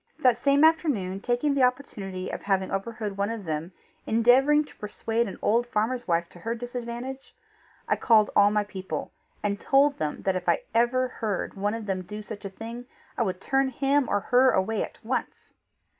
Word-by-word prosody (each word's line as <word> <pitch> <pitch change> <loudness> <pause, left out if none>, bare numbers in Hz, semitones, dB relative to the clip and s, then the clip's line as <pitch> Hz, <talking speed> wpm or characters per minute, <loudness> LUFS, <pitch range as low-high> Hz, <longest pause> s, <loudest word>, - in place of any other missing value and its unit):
That 255 -6 +3
same 280 +1 +4
afternoon, 280 - +2
taking 245 +5 +1
the 275 - +1
opportunity 205 -8 -1
of - - -5
having 190 -1 0
overheard 210 +1 -3
one 200 +1 0
of 225 -4 -5
them 160 +2 -3 0.4
endeavouring 260 +7 +4
to - - -17
persuade 225 +2 -2
an 195 - -7
old 235 +3 +2
farmer's 240 +2 -1
wife 170 -1 +1
to 175 - -15
her 230 +6 -3
disadvantage, 245 +2 -6 0.5
I - - +2
called 220 -3 +4
all 205 0 +6
my 210 0 +1
people, 190 -6 -5 0.3
and 200 -1 -1
told 280 +1 +3
them 150 -1 -3
that 190 -1 +1
if 180 -1 -1 0.2
ever 240 +2 +3
I 250 - -8
heard 210 -4 -2
one 205 +2 -1
of 225 -2 -6
them 190 -2 -2
do 210 +3 -8
such 205 -1 -8
a - - -3
thing, 230 +5 -8 0.3
I - - -2
would 190 -5 -1
turn 270 +5 +1
him 275 +1 +1
or 205 - +1
her 250 +5 +4
away 210 0 +1
at - - -8
once. 255 +4 -4
225 Hz, 190 wpm, -26 LUFS, 195-255 Hz, 0.5 s, all